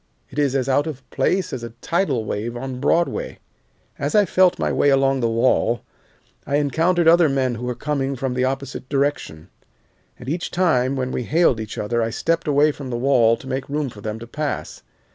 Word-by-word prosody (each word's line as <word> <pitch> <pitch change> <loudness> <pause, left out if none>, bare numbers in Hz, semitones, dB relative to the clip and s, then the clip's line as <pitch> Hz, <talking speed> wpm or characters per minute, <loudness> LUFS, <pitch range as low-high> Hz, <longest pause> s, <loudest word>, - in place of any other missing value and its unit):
It 135 - -4
is 140 -2 +1
as 130 -2 0
out 145 +3 +2
of 135 -5 -7
place 180 +7 0
as 130 - -4
a 115 -1 -8
tidal 165 - 0
wave 110 +4 -3
on 130 0 -5
Broadway. 175 - 0 0.6
"As - - -1
I 210 -1 +5
felt 185 0 +3
my - - -1
way 145 - +3
along 135 0 +3
the 115 -2 +1
wall, 115 0 +1 0.6
I 140 - 0
encountered 165 +4 +2
other 170 -1 +6
men 130 -2 0
who 120 +1 -5
were 125 - -2
coming 140 +1 -2
from 130 0 -2
the 125 0 0
opposite 135 0 -4
direction, 135 - -2 0.7
and 125 - -12
each 165 +5 -2
time 140 -8 +1
when 130 -1 -2
we - - -2
hailed 160 -6 +3
each 110 -1 -6
other 115 +3 -1
I 115 - 0
stepped 165 +8 -1
away 150 +1 +4
from 140 -2 -8
the 120 - -2
wall 120 -3 +3
to - - -14
make 130 +1 -4
room 145 -1 -1
for 105 - -12
them 110 +1 -4
to 115 - -9
pass. 150 +5 -4
135 Hz, 205 wpm, -21 LUFS, 120-150 Hz, 0.7 s, other